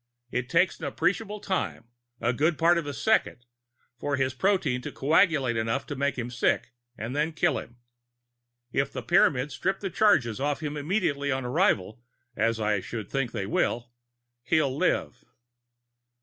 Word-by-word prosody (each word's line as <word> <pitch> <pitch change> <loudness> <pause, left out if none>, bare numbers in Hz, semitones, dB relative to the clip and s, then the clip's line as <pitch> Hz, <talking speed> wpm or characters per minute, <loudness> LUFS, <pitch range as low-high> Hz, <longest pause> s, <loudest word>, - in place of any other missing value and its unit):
It 125 0 -2
takes 175 +4 +2
an 160 - -5
appreciable 205 +8 -1
time, 110 - -3 0.3
a 120 +2 +1
good 155 +5 +1
part 170 +1 +4
of 160 - -6
a - - -2
second, 220 - +1 0.5
for 145 -1 -1
his 130 -1 0
protein 155 -5 +1
to - - -6
coagulate 145 -4 +2
enough 115 0 -1
to 145 - -5
make 140 +1 -1
him 120 0 -4
sick 120 0 0 0.2
and 115 +5 -5
then 155 +2 0
kill 155 - +1
him. 120 - -12 0.9
If 135 +1 0
the 130 - -5
Pyramids 125 +3 +3
strip 190 +6 -1
the 195 -2 -4
charges 145 - +3
off 145 +1 0
him 150 0 -3
immediately 145 -3 0
on 130 -1 -1
arrival, 125 - +1 0.3
as 115 +1 +1
I 105 -2 +1
should 110 +2 -6
think 135 -4 -1
they 105 -4 -3
will, 120 +4 -1 0.5
he'll 145 -2 +1
live." - - 0
135 Hz, 165 wpm, -27 LUFS, 120-165 Hz, 0.9 s, part